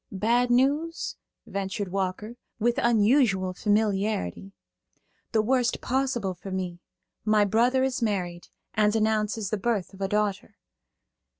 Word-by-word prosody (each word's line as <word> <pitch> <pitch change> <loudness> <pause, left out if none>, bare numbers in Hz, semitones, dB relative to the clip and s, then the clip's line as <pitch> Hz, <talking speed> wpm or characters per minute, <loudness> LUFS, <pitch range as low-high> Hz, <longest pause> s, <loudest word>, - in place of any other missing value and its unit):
"Bad 235 +5 +2
news?" 285 +7 +1 0.3
ventured 195 0 -3
Walker, 195 +4 -3 0.2
with 235 +2 +1
unusual 215 -4 +3
familiarity. 205 - 0 0.8
"The 220 -1 +2
worst 250 +1 +1
possible 250 -7 -1
for 185 +2 -10
me. 185 -2 -4 0.4
My 215 -1 +4
brother 240 +6 +3
is 265 -1 -1
married, 180 -6 -2 0.3
and 210 0 +2
announces 215 -1 0
the 215 - 0
birth 205 -3 -1
of 195 - -12
a 195 - +1
daughter." 210 0 -1
215 Hz, 120 wpm, -26 LUFS, 195-240 Hz, 0.8 s, My